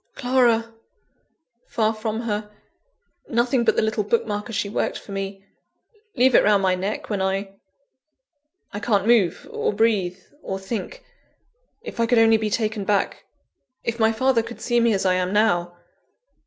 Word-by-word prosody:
Clara! 240 -3 +2 0.9
far 220 -1 0
from 220 0 -3
her 210 -2 -3 0.8
nothing 240 +1 +1
but - - +2
the - - +2
little 220 -1 0
book 225 +3 0
marker 210 +1 -4
she 205 -1 -1
worked 200 - -2
for - - -12
me 195 0 -5 0.7
leave 255 0 +4
it - - +6
round 205 -1 +3
my 185 -1 +3
neck 190 +3 -3
when 200 -2 -1
I 195 +1 -2 1.2
I 205 - -4
can't 205 -3 +1
move, 225 -7 +2
or - - -1
breathe, 200 -4 +1 0.2
or 190 - -4
think 225 - -6 0.8
if - - -8
I 230 - +2
could 245 0 +3
only 225 0 +6
be 215 -1 -2
taken 215 -1 -1
back 200 0 -1 0.6
if 235 0 -3
my 220 0 +4
father 250 +1 +2
could 235 +1 -9
see 240 -1 +1
me 235 0 +3
as 195 -1 -1
I 185 - +3
am 185 0 0
now! 175 -5 +1
215 Hz, 165 wpm, -23 LUFS, 195-230 Hz, 1.2 s, it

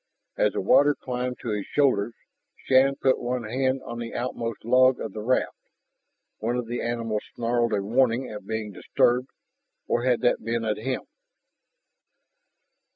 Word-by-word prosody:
As - - +2
the - - -1
water 145 - +5
climbed 125 0 -4
to 120 - -3
his 105 -2 -2
shoulders 120 -6 +1 0.5
Shann 135 +1 +4
put 130 -1 +1
one 125 0 -2
hand 130 +4 -1
on 120 0 -6
the 115 -1 -6
outmost 115 -3 -4
log 130 +1 +5
of - - -5
the 110 - -5
raft. 125 +4 +1 0.8
One 115 +3 -1
of 125 - -2
the 120 +1 -3
animals 115 -2 -2
snarled 120 0 0
a 100 -1 0
warning 120 +3 +2
at 105 -2 -9
being 110 -1 -3
disturbed. 125 +6 +1 0.6
Or 120 - 0
had 125 -2 +2
that - - +2
been 115 0 -1
at 105 -1 0
him? 130 +4 -3
120 Hz, 160 wpm, -26 LUFS, 115-130 Hz, 0.8 s, water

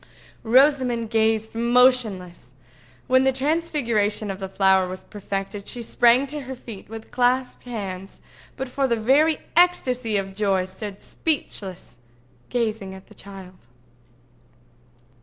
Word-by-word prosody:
Rosamond 250 -2 +3
gazed 220 -1 +1
motionless. 230 - +2 0.5
When 260 +1 +4
the 265 - +4
transfiguration 260 -8 0
of 190 - -7
the 190 -1 -5
flower 190 -1 +3
was 185 +1 -7
perfected, 195 0 -5
she 240 - -6
sprang 240 +3 +4
to 295 +2 -5
her 265 0 -7
feet 225 -6 -10
with 225 0 -9
clasped 250 +1 0
hands, 195 -5 -6 0.4
but 265 0 -3
for 270 +2 0
very 265 +7 +3 0.2
ecstasy 255 - +2
of 195 -1 -3
joy 195 -3 +1
stood 195 +2 -8
speechless, 195 - -4 0.5
gazing 215 -5 -2
at 190 - -14
the - - -15
child. 190 -8 -12
225 Hz, 120 wpm, -23 LUFS, 195-255 Hz, 0.5 s, When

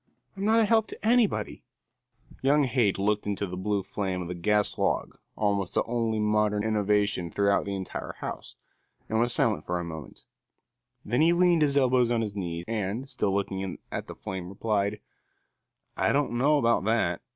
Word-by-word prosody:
I'm 195 +1 -3
not 220 +2 +4
a - - +4
help 220 0 +3
to - - -9
anybody." 235 -3 +1 0.8
Young 145 +2 +4
Haight 120 -6 +1
looked 105 +1 0
into 100 0 -1
the 90 -1 -6
blue 100 +1 -1
flame 95 -2 -3
of 85 - -7
the - - -2
gas 105 +4 +1
log, - - -1 0.2
almost 100 -3 -1
the - - +3
only 115 -2 -1
modern 105 -1 +1
innovation 105 -4 +1
throughout 100 +3 +1
the 100 -1 -3
entire 95 -1 -5
house, - - -6 0.5
and 110 - 0
was 120 +1 +2
silent 75 - +1
for 90 0 -2
a - - -3
moment; 80 -5 -9 0.8
then 120 +7 +1
he 165 +2 +5
leaned 175 -2 +4
his 145 -2 +3
elbows 130 -3 +3
on 120 -1 +1
his 105 -2 -4
knees 85 -3 -4
and, 110 +4 -3
still 105 -6 0
looking 95 -1 -2
at - - -4
the - - -8
flame, 95 -2 -6
replied: 100 0 -1 1.0
"I - - +2
don't 145 0 +1
know 140 +6 +3
about 115 -7 +2
that. 105 -6 +1
105 Hz, 180 wpm, -27 LUFS, 95-125 Hz, 1.0 s, he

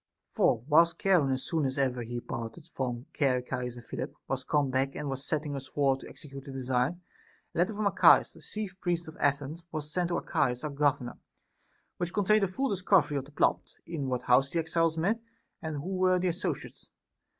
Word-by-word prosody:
For 115 - +2
whilst 165 +2 +5
Charon, 180 -8 +4
as 130 0 -1
soon 160 -3 0
as 130 0 -1
ever 130 -3 +1
he 120 +1 -4
parted 120 +4 -6
from 125 -2 -3 0.2
Archias 125 -2 0
and 120 -1 -11
Philip, - - -5
was 130 -1 -2
come 145 -3 +1
back 135 +1 0
and 150 -1 -3
was 135 0 -4
setting 150 -2 -2
us 135 -1 -6
forward 135 -1 +1
to - - -10
execute 140 -2 -10
the 140 - -9
design, 130 +5 0 0.5
a - - -3
letter 185 +5 +2
from 210 0 -1
Archias, 200 - +6
the - - -15
chief 200 -3 -6
priest 175 -2 -1
of 160 - -9
Athens, 145 +3 0
was 150 -1 -4
sent 180 -1 +1
to 175 - -1
Archias 125 -1 0
our 150 - -2
governor, 140 -3 0 0.8
which 175 0 -2
contained 210 +1 +4
a - - +3
full 265 +10 -1
discovery 180 -6 +3
of 135 - -3
the 145 - -16
plot, - - +1
in 160 -5 -3
what 125 -1 -1
house 130 +3 +4
the 170 - -3
exiles 165 0 +1
met, 205 +8 +1 0.4
and 160 -1 -4
who 180 +7 -3
were 185 0 +4
the 180 0 +1
associates. 175 +2 -4
145 Hz, 205 wpm, -30 LUFS, 130-175 Hz, 0.8 s, Archias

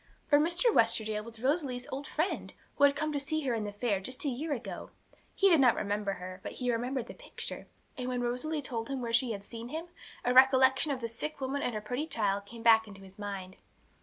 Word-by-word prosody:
For 290 -1 +5
Mr. 345 +9 +3
Westerdale 220 -2 +2
was 230 0 -10
Rosalie's 260 -1 0
old 275 +2 -4
friend, 320 +5 -2 0.2
who 285 - +6
had 280 0 +4
come 305 +1 -1
to 285 - 0
see 310 +3 -1
her 265 -4 0
in 220 -2 -1
the 205 - -4
fair, 205 -1 0
just 255 +9 -3
a - - +2
year 290 +5 -3
ago. 260 -5 -4 0.5
He 395 - +4
did 335 -5 +6
not 255 -3 +6
remember 205 -1 -1
her, 185 0 -8
but - - -6
he 250 -1 -1
remembered 245 +1 -1
the - - -9
picture; - - -6 0.3
and 250 - -3
when 250 -1 -1
Rosalie 265 +6 -2
told 230 -2 -3
him 275 -1 -2
where 230 -1 -3
she 235 -1 +3
had 200 -1 -7
seen 230 +2 -8
him, 325 +5 -5 0.4
a 250 - +3
recollection 265 +2 +6
of 260 -2 -3
the 230 - -2
sick 280 +7 -4
woman 270 +1 -2
and 240 - -1
her 215 - -2
pretty 250 +8 -3
child 200 -7 -1
came 230 +1 -10
back 225 -1 +6
to 210 - -11
his 195 +1 -15
mind. 195 -2 -6
245 Hz, 235 wpm, -31 LUFS, 220-285 Hz, 0.5 s, who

